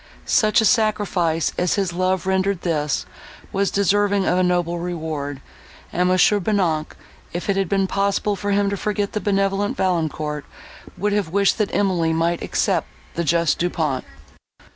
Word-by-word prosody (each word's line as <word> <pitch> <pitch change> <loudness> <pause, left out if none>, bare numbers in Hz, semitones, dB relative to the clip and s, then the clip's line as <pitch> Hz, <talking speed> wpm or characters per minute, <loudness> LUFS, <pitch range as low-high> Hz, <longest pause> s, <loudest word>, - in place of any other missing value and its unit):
Such 215 +1 +3
a - - +2
sacrifice 205 -8 +1
as 180 -1 +1
his 195 -3 -1
love 185 0 0
rendered 190 0 0
this, 150 -5 -1 0.5
was 195 0 +1
deserving 200 0 +2
of 180 - +2
a - - +3
noble 175 -1 0
reward, 155 -5 -4 0.5
and 180 +1 +2
Mons. 185 0 +5
Bonnac, 185 -6 0 0.4
if 175 - -4
it - - -1
had 195 -3 0
been 195 -1 +2
possible 200 +1 0
for 205 +1 -4
him 200 0 +2
to 200 - -2
forget 205 0 -2
the 210 - -3
benevolent 195 0 0
Valancourt, 155 -5 -1 0.5
would 205 +2 0
have 205 -5 0
wished 200 +5 +2
that 210 - +1
Emily 175 -5 +1
might 165 +1 0
accept - - 0 0.3
the 170 - -2
just 170 -1 +1
Du 175 - +1
Pont. 150 -7 -1
185 Hz, 165 wpm, -21 LUFS, 170-200 Hz, 0.5 s, Mons